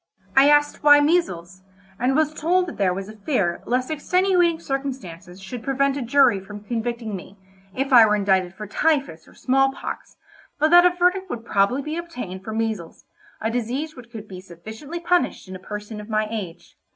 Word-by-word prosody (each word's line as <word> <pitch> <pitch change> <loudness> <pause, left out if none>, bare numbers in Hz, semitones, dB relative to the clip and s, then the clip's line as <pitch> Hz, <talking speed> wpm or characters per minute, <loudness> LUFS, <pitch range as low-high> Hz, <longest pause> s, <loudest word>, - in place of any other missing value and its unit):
I 270 +2 +7
asked 295 0 +3
why 290 0 +7
measles? 185 - 0 0.4
and 255 +3 +1
was 310 0 +2
told 355 +4 +1
that 345 - -8
there 195 -3 +2
was 190 +2 -5
a 215 - -10
fear 200 - -1
lest 255 +3 0
extenuating 355 +2 +2
circumstances 225 - -6
should 210 +5 -7
prevent 275 +1 0
a 280 - -3
jury 245 -3 +4
from 205 +2 -10
convicting 230 -1 -3
me, 190 +2 -10 0.4
if 270 +1 -1
I 230 -3 +9
were 210 - +2
indicted 190 -3 +1
for 210 - -7
typhus 270 - -1
or - - -19
small 270 +1 +2
pox, - - -8 0.4
but 310 +2 +2
that 350 +1 +8
a - - +5
verdict 365 +2 +1
would 230 -6 -6
probably 215 +6 +1
be 305 +3 -4
obtained 250 - -7
for 220 - -6
measles, 220 -6 -4 0.3
a 220 - -2
disease 250 +7 -3
which 240 -2 -13
could 220 -3 -9
be 185 -2 -9
sufficiently 220 - -9
punished 345 - 0
in 185 - -8
a - - -8
person 210 +2 -7
of 210 - -12
my 215 0 0
age. 195 -7 -7
240 Hz, 190 wpm, -23 LUFS, 200-295 Hz, 0.4 s, I